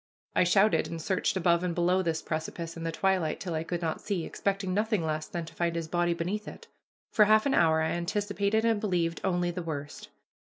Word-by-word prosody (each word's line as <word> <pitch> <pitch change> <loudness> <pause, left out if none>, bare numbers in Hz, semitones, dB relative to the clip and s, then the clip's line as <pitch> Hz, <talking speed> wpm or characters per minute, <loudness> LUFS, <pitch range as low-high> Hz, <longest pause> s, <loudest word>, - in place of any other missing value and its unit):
I - - +5
shouted 185 -2 +3
and 165 - -5
searched 190 +3 0
above 170 -1 +3
and 175 -2 -1
below 180 +2 +2
this 165 -3 -1
precipice 165 +1 -4
in 165 - -7
the 165 - -1
twilight 185 -2 0
till 180 -3 -4
I 160 0 -1
could 175 +1 -4
not 160 -1 -2
see, 195 -6 -2
expecting 195 -2 -2
nothing 210 -3 +1
less 155 -1 -2
than 170 -1 -4
to 160 - -12
find 170 0 -1
his 165 -1 -3
body 175 +1 +1
beneath 190 +6 -3
it. - - -9 0.5
For 210 - +5
half 215 +1 +4
an 280 - +2
hour 160 -1 +4
I 160 - 0
anticipated 200 +4 0
and 225 -2 +2
believed 170 -5 0
only 175 -2 +1
the 180 +1 -4
worst. 145 -3 -6
175 Hz, 220 wpm, -29 LUFS, 165-195 Hz, 0.5 s, I